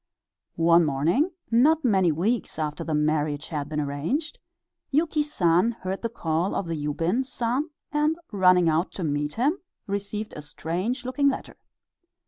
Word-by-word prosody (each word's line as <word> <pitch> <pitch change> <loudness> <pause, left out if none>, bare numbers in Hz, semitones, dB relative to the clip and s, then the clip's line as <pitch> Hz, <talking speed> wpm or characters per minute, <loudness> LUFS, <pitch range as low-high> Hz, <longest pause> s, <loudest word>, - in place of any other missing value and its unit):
One 170 +1 +5
morning, 160 - +2 0.2
not 295 +6 +4
many 190 -7 +4
weeks 200 +10 -1
after 150 -2 -3
the 160 - -1
marriage 150 -1 0
had 150 -3 -3
been 155 -1 -2
arranged, 150 - -2 0.5
Yuki 305 +1 +1
San 200 - +2
heard 190 -3 -5
the 230 - -2
call 170 -4 -1
of 200 - -1
the 165 -1 -3
Yubin 165 - 0
San, 250 +4 -2 0.2
and 300 +2 +1
running 185 -3 +5
out 160 +3 +1
to 185 - -5
meet 150 -1 -1
him, 285 - +1 0.3
received 200 +1 -4
a 150 - -7
strange 175 - -3
looking 280 +3 +2
letter. 270 - -5
185 Hz, 150 wpm, -25 LUFS, 155-250 Hz, 0.5 s, One